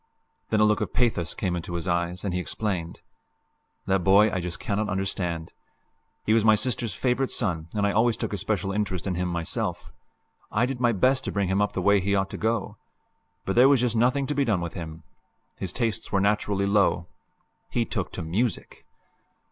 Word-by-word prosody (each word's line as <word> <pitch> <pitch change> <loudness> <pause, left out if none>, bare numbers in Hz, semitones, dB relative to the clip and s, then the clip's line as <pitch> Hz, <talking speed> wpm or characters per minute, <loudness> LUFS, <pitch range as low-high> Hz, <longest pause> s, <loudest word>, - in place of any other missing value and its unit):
Then 110 - +2
a - - +5
look 105 0 +3
of - - -3
pathos 110 -9 +1
came 90 -2 -1
into 85 0 -4
his 85 +1 -4
eyes, 85 +1 -1
and 95 - -1
he 90 - 0
explained: 90 -3 -3 0.8
"That 95 -1 +1
boy 100 +3 +5
I 95 - -1
just 90 -1 -5
cannot 105 +1 -1
understand. 90 -4 -2 0.7
He 110 - +3
was 115 -1 +4
my 110 -1 +6
sister's 115 0 -1
favorite 130 +1 0
son, 85 -8 -2
and 100 -1 +1
I 100 - +2
always 115 +2 +2
took - - -3
a - - -1
special 100 +1 -1
interest 100 -3 -2
in 95 - -1
him 90 +1 -1
myself. 85 -2 -3 0.6
I 115 +3 +2
did 130 -1 -4
my 120 -1 +3
best 130 +5 +2
to - - -2
bring 100 -2 0
him 95 +2 +2
up 105 - 0
the 95 - -2
way 100 +1 +5
he 100 +2 0
ought 95 0 0
to - - -5
go. 110 -1 -1 0.7
But 95 - -1
there 125 +3 +7
was 140 -4 +4
just 120 -2 +1
nothing 130 +5 +2
to 150 - -2
be 140 -1 +2
done 105 -8 +1
with 85 -1 -4
him. 80 -2 -7 0.5
His 90 - -3
tastes 115 +1 -2
were 100 - +2
naturally 100 0 +1
low. 100 -4 +2 0.6
He - - 0
took - - -3
to - - -4
music!" 100 +6 -2
100 Hz, 205 wpm, -26 LUFS, 90-115 Hz, 0.8 s, there